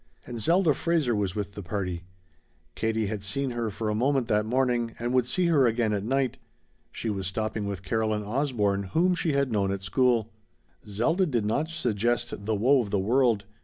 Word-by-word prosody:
And 120 -2 -6
Zelda 170 - +3
Fraser 155 -6 +1
was 100 -3 -1
with 100 -1 -4
the 100 - -7
party. 90 -3 -4 0.7
Katie 110 -1 -1
had 105 0 -3
seen 135 +7 -2
her 120 -2 -2
for 105 +2 -4
a 105 - +1
moment 130 +2 +1
that 105 0 +2
morning, 120 -2 0
and 120 +2 -2
would 125 -2 +2
see 180 +7 +1
her 150 -7 +4
again 115 -1 +1
at 100 -1 -1
night. 130 +2 0 0.5
She 115 - -3
was 95 -2 -3
stopping 110 +1 -2
with 100 -2 -5
Caroline 110 0 0
Osborne, 105 -4 0
whom 180 +3 +3
she 165 -3 0
had 140 -2 +1
known 100 -3 +1
at 100 -1 -4
school. 115 +2 +1 0.5
Zelda 160 - +1
did 120 -8 0
not 145 +9 0
suggest 120 -8 -1
the 110 - +1
woe 130 +6 +4
of 105 - -5
the 100 - +1
world. 115 0 +2
115 Hz, 195 wpm, -27 LUFS, 105-130 Hz, 0.7 s, her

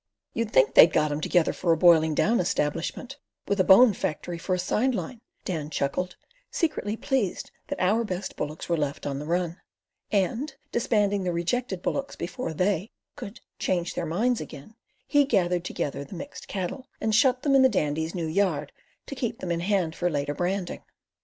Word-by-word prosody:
"You'd 230 -2 -1
think 135 +1 +4
they'd 160 - +8
got 150 -1 +2
'em 145 +1 -2
together 175 +1 +2
for 170 - 0
a 165 - +3
boiling 160 -2 +5
down 230 +8 +2
establishment, 175 - -2 0.3
with 200 0 0
a - - +6
bone 210 +5 +7
factory 170 0 -4
for 185 +2 -1
a - - -2
side 235 +8 +1
line," 210 +5 -5 0.2
Dan 155 -5 -3
chuckled, 160 +5 -2 0.3
secretly 230 -10 -1
pleased 255 -7 -1 0.2
that - - -4
our 210 +6 +2
best 190 -3 -4
bullocks 150 +1 -5
were 170 - +1
left 145 -1 -3
on 140 -1 -2
the 150 - -6
run, 175 +1 -1 0.5
and, 230 - 0 0.2
disbanding 205 -4 +1
the 180 - 0
rejected 185 +3 -2
bullocks 275 0 -2
before 185 +3 -4
"they" 185 +4 0 0.3
could 200 - -9 0.2
"change 175 -2 -1
their 170 - -3
minds 230 +9 +1
again," 150 +5 -10 0.3
he 290 0 +4
gathered 180 -9 +1
together 140 -5 -3
the 140 - -10
mixed 280 +12 -8
cattle 200 +7 -4
and 220 0 0
shut 255 +3 +3
them 285 - +2
in 270 - +6
the 260 - +6
Dandy's 160 -2 -1
new 170 -2 -2
yard, 160 -4 0 0.3
to - - -7
keep 240 -4 -3
them 180 - -4
in 170 - 0
hand 175 -3 0
for 175 - 0
later 145 -2 -1
branding. 180 +3 -2
180 Hz, 185 wpm, -26 LUFS, 160-225 Hz, 0.5 s, they'd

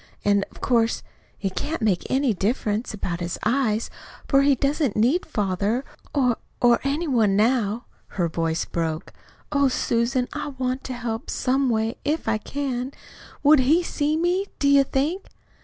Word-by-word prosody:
And, 200 -1 +3
of - - -16
course, 230 -2 +2 0.4
it 195 -2 -2
can't 320 - -2
make 195 -5 +1
any 265 -3 +2
difference 210 +2 -1
about 180 -5 -3
his 175 0 -3
eyes, 225 -2 +1 0.4
for 275 -1 +4
he 280 0 +4
doesn't 280 -3 0
need 255 +12 +2
father, 210 - -1 0.3
or 250 -5 +2 0.2
or 240 -1 +5
any 290 +5 -1
one 225 -8 +3
now." 225 +1 +1 0.2
Her 175 -3 -1
voice 165 0 -1
broke. 165 0 -3 0.4
"Oh, 280 -1 +3
Susan, 245 0 0
I - - -4
want 255 +1 -2
to 260 - -4
help, 240 0 -4
some 265 +1 +1
way, 225 0 0
if 305 -1 -1
I 220 -1 +1
can! 265 +1 -3 0.5
WOULD 295 0 +7
he 305 +7 +4
see 305 -2 0
me, 355 +4 +1
do 285 - +1
you 280 0 +6
think?" 300 +9 -1
250 Hz, 160 wpm, -24 LUFS, 215-280 Hz, 0.5 s, WOULD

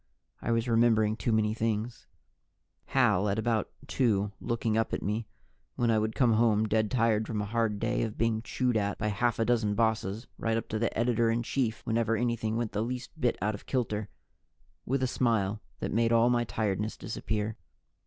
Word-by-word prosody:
I - - -1
was 115 +1 +1
remembering 115 -2 +3
too 115 - -1
many 110 -1 +2
things: 115 +1 -2 0.8
Hal 105 -7 +2
at 100 - 0
about 110 -1 0 0.2
two, 105 -7 +1
looking 115 -2 -1
up 115 0 0
at - - -5
me 105 +2 -2 0.5
when 120 -1 +2
I 110 - +3
would 110 0 -1
come 120 -4 +4
home 110 -1 +3
dead 110 0 +1
tired 115 -3 +2
from 110 -3 -2
a 105 - -1
hard 110 -1 0
day 115 +3 0
of 110 -2 -3
being 115 -1 +1
chewed 125 +1 -1
at 100 -1 -1
by 105 - -1
half 120 +3 0
a 115 - +1
dozen 110 -4 +1
bosses 110 0 0
right 115 0 0
up 115 - -4
to 110 - -2
the 115 - -1
editor 115 0 +2
in 115 +1 0
chief 120 -2 -2
whenever 115 0 +1
anything 115 -1 -1
went 115 -2 -2
the 105 - -1
least 125 +2 -4
bit 120 -2 +2
out 105 +1 +1
of 100 - -9
kilter 110 -5 -1 0.8
with 130 +1 0
a - - +2
smile 110 -5 0 0.2
that - - -2
made 115 +1 +2
all 115 +1 +4
my 120 -1 +2
tiredness 105 0 -2
disappear. 110 -1 -3
115 Hz, 195 wpm, -29 LUFS, 105-120 Hz, 0.8 s, come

